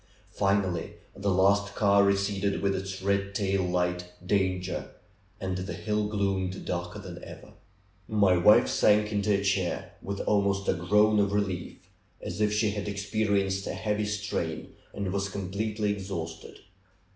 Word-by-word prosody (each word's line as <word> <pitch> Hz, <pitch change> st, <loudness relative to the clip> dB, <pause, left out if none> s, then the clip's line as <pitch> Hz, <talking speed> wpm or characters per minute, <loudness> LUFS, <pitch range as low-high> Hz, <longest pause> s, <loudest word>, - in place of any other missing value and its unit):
Finally 95 Hz, -3 st, 0 dB, 0.2 s
the 100 Hz, +1 st, -1 dB
last 100 Hz, +2 st, +3 dB
car 100 Hz, -1 st, +4 dB
receded 100 Hz, 0 st, +1 dB
with 100 Hz, 0 st, +2 dB
its 95 Hz, 0 st, -5 dB
red 100 Hz, 0 st, 0 dB
tail 100 Hz, -1 st, +1 dB
light 90 Hz, 0 st, -1 dB
Danger 95 Hz, -1 st, 0 dB, 0.5 s
and 95 Hz, -1 st, -2 dB
the 95 Hz, +3 st, -4 dB
hill 105 Hz, -1 st, -1 dB
gloomed 95 Hz, -2 st, -1 dB
darker 85 Hz, 0 st, -3 dB
than -, -, -9 dB
ever. -, -, -11 dB, 0.5 s
My 100 Hz, -4 st, +4 dB
wife 90 Hz, +5 st, +6 dB
sank 105 Hz, 0 st, +3 dB
into 105 Hz, 0 st, +1 dB
a 100 Hz, -1 st, +2 dB
chair, 95 Hz, -3 st, -1 dB
with 100 Hz, 0 st, -4 dB
almost 100 Hz, -1 st, +1 dB
a -, -, +4 dB
groan 105 Hz, +4 st, +3 dB
of 100 Hz, 0 st, +2 dB
relief, 95 Hz, -4 st, -2 dB, 0.4 s
as -, -, -5 dB
if 105 Hz, 0 st, +3 dB
she 105 Hz, 0 st, +2 dB
had 105 Hz, -1 st, -4 dB
experienced 100 Hz, -1 st, 0 dB
a -, -, -3 dB
heavy 105 Hz, 0 st, -1 dB
strain, 105 Hz, -6 st, -3 dB, 0.2 s
and 100 Hz, -2 st, -3 dB
was 100 Hz, 0 st, -1 dB
completely 105 Hz, +2 st, -2 dB
exhausted. 85 Hz, -5 st, -5 dB
100 Hz, 145 wpm, -28 LUFS, 95-105 Hz, 0.5 s, wife